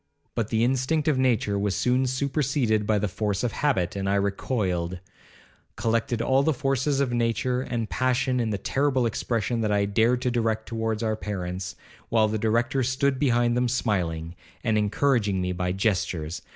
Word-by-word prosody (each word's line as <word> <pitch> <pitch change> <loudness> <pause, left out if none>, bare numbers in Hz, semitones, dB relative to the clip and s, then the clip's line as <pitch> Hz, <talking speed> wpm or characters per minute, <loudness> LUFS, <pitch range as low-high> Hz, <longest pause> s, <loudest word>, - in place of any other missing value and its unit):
But 115 -3 -1
the 110 0 +1
instinct 135 +5 +1
of 145 -4 +2
nature 110 -6 +1
was 100 -2 0
soon 125 +6 +2
superseded 130 -5 0
by 110 - +3
the 105 +1 0
force 100 +2 -2
of 120 - 0
habit, 100 -13 0
and 95 0 -2
I 100 - +2
recoiled, 95 -3 -1 0.8
collected 115 0 0
all 135 +1 +3
the 155 +1 +1
forces 135 +2 0
of 135 -3 0
nature 120 +2 0
and 120 -3 -3
passion 130 +1 0
in 115 -2 0
the 105 - -1
terrible 135 +4 +1
expression 115 0 -1
that 105 -1 0
I 100 -1 +2
dared 115 +5 +2
to 125 - +1
direct 110 -2 0
towards 115 -1 -2
our 110 -1 0
parents, 90 -3 -4 0.3
while 110 -1 +3
the 110 0 -2
Director 120 +4 +1
stood 130 +1 +1
behind 120 -3 +2
them 125 0 +2
smiling, 90 -9 -1 0.3
and 110 - +1
encouraging 105 -1 +1
me 90 0 -1
by 90 0 -1
gestures. 90 -5 -1
115 Hz, 175 wpm, -26 LUFS, 100-130 Hz, 0.8 s, by